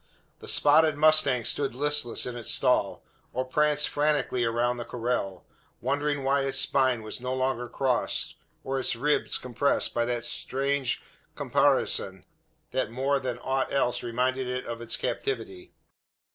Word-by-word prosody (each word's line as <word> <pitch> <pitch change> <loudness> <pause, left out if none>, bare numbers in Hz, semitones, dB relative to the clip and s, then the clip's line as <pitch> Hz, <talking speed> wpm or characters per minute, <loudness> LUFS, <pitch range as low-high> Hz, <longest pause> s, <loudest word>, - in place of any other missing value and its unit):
The - - -12
spotted 155 0 +4
mustang 150 -6 +4
stood 140 -4 0
listless 145 -3 +2
in 125 - -5
its 120 -2 -4
stall, - - +1 0.3
or 130 +1 -1
pranced 150 +2 +1
frantically 145 -4 0
around 120 +1 0
the 120 - -4
corral; 115 -7 -3 0.3
wondering 145 0 -1
why 140 +1 +2
its 135 -1 0
spine 130 -3 +2
was 110 +2 -6
no 125 +1 -2
longer 130 -2 -1
crossed, 130 0 0 0.3
or 135 0 -2
its 130 - -1
ribs 145 +5 0
compressed, 125 +3 0
by 120 - +1
that 120 -1 -2
strange 135 -1 -1 0.3
caparison, 95 -1 +1 0.5
that 130 - -1
more 135 +4 0
than 130 -2 -4
aught 130 0 -1
else 130 -3 +1
reminded 125 +2 -1
it 125 0 -3
of 115 0 -6
its 120 - -3
captivity. 380 -3 -4
130 Hz, 145 wpm, -27 LUFS, 120-140 Hz, 0.5 s, spotted